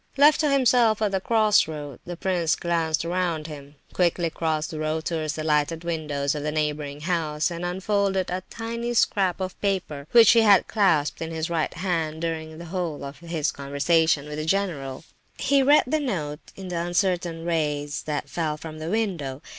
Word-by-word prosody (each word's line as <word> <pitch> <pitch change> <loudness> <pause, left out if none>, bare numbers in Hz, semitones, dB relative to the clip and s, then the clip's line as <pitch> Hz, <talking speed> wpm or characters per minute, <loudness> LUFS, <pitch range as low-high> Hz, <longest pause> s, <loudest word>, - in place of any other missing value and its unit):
Left 295 +2 +6
to 305 -2 +2
himself 245 -5 +4
at 205 - +1
the 190 -1 0
cross 215 -3 +3
roads, 145 -4 -7
the 175 -1 -6
prince 175 -4 +1
glanced 165 -2 0
around 170 -3 -1
him, 145 -2 -9 0.2
quickly 170 -2 +1
crossed 160 -2 -1
the 155 - -5
road 155 +1 -2
towards 160 -2 -2
the 155 - -4
lighted 155 +2 +1
window 155 -4 -3
of 140 - +2
a 150 0 -3
neighbouring 150 -1 -2
house, 160 -2 -1
and 170 0 -5
unfolded 190 +1 0
a 185 +1 -2
tiny 235 +1 -4
scrap 195 -5 +2
of 185 -1 -5
paper 170 -8 -2
which 230 -3 +8
he 230 - +6
had 215 -2 +5
held - - -25
clasped 175 -10 +2
in 160 - -3
his 160 0 -3
right 165 0 -1
hand 165 -3 -2
during 160 -1 -4
the 170 - -8
whole 170 -6 -3
of 140 0 -8
his 160 -4 -2
conversation 145 +2 +1
with 150 0 -5
the 155 - -3
general. 160 -8 -1 0.3
He 280 0 +3
read 290 +3 +6
the 310 +5 0
note 160 - -4
in 190 -1 -8
the 175 -1 -2
uncertain 175 -1 -1
rays 150 -4 -1
that 150 -1 -2
fell 155 -3 -2
from 155 0 -8
the 160 +1 -4
window. 170 -10 -2
165 Hz, 190 wpm, -25 LUFS, 150-190 Hz, 0.3 s, which